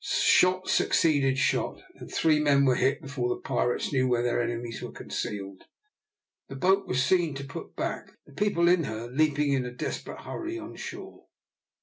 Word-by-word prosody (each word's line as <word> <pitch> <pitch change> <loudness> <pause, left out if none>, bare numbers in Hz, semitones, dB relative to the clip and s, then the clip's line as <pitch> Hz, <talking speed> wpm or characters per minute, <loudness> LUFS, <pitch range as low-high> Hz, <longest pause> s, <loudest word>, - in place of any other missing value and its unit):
Shot 185 +1 +3
succeeded 140 -5 +2
shot, 155 - 0
and - - -12
three 155 -2 +3
men 140 -2 +4
were 130 - +4
hit 135 +5 +1
before 135 -3 -2
the 120 - -2
pirates 120 +1 -1
knew 130 -1 +2
where 120 -1 +1
their 120 0 +1
enemies 120 -1 -4
were - - -6
concealed. 100 -2 -6 0.8
The 135 - -7
boat 190 +7 +2
was 130 +1 +1
seen 170 0 +2
to 140 - -5
put 135 - -9
back, - - -4
the 145 - -18
people 170 0 +1
in 175 -2 +4
her 110 +2 -5
leaping 145 0 +2
in 130 -2 +1
a 125 - -4
desperate 125 - -5
hurry 345 0 -5
on 330 0 -8
shore. - - -9
140 Hz, 180 wpm, -27 LUFS, 125-165 Hz, 0.8 s, men